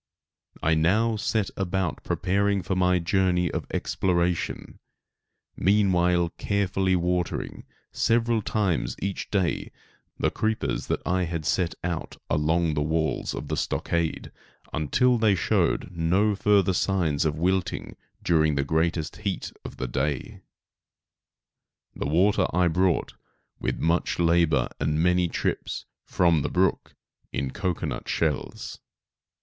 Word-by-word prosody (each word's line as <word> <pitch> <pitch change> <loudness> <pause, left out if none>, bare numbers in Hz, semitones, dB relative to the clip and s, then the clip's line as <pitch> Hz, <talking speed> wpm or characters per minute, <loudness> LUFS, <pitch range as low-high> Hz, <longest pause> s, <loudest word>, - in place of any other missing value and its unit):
I 80 - +3
now 105 +9 +2
set 105 -1 -1
about 95 -4 -2
preparing 100 +1 0
for 95 - -1
my 90 0 +3
journey 90 -1 +1
of - - -4
exploration, 90 -2 -1 0.8
meanwhile 90 -3 +3
carefully 95 -2 +1
watering, 90 0 -2 0.3
several 115 -1 +2
times 100 -5 0
each 100 0 -3
day, 95 -5 -1 0.5
the - - +1
creepers 110 0 -1
that - - -1
I 90 0 +1
had 85 -2 -4
set 90 +1 0
out 85 -2 -4
along 80 +2 +2
the 75 - 0
walls 80 +1 -1
of - - -6
the - - -1
stockade, 85 -1 -2 0.4
until 120 - +2
they 110 -3 +4
showed 85 - +1
no 90 +5 +2
further 100 -1 +3
signs 85 -6 +1
of 75 -1 0
wilting 90 +2 -1 0.3
during 80 -3 +3
the 70 - +1
greatest 80 +1 -1
heat 100 -3 -3
of - - -9
the 65 - -3
day. 70 +1 -2 1.5
The - - -3
water 95 +5 +3
I 90 0 +3
brought, 90 +2 +1 0.5
with - - -2
much 85 +2 0
labor 85 -6 +3
and 75 0 0
many 90 0 +3
trips, - - -3 0.2
from 85 -4 +3
the - - -2
brook, 95 0 0 0.4
in 65 0 -2
cocoanut 90 -2 -3
shells. 80 -4 -2
90 Hz, 125 wpm, -26 LUFS, 80-95 Hz, 1.5 s, they